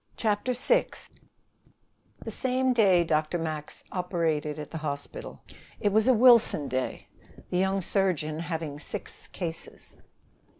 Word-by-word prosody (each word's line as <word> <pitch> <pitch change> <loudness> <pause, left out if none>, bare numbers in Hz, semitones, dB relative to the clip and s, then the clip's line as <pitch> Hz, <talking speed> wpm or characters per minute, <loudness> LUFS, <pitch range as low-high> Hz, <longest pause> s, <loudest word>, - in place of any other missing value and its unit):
CHAPTER 215 +3 0
VI - - +3 1.4
The - - -4
same 260 0 +1
day 195 -7 +5
Dr. 155 +1 0
Max 155 -2 -5
operated 165 -5 -1
at 150 -2 -7
the 160 - -4
hospital. 155 - -6 0.4
It 205 - +1
was 220 +2 +4
a 260 - +6
Wilson 230 - +5
day, 130 0 -3 0.4
the 180 - +1
young 190 +1 +1
surgeon 170 -5 0
having 160 -3 -4
six - - -7
cases. 165 -3 -6
175 Hz, 125 wpm, -27 LUFS, 155-215 Hz, 1.4 s, a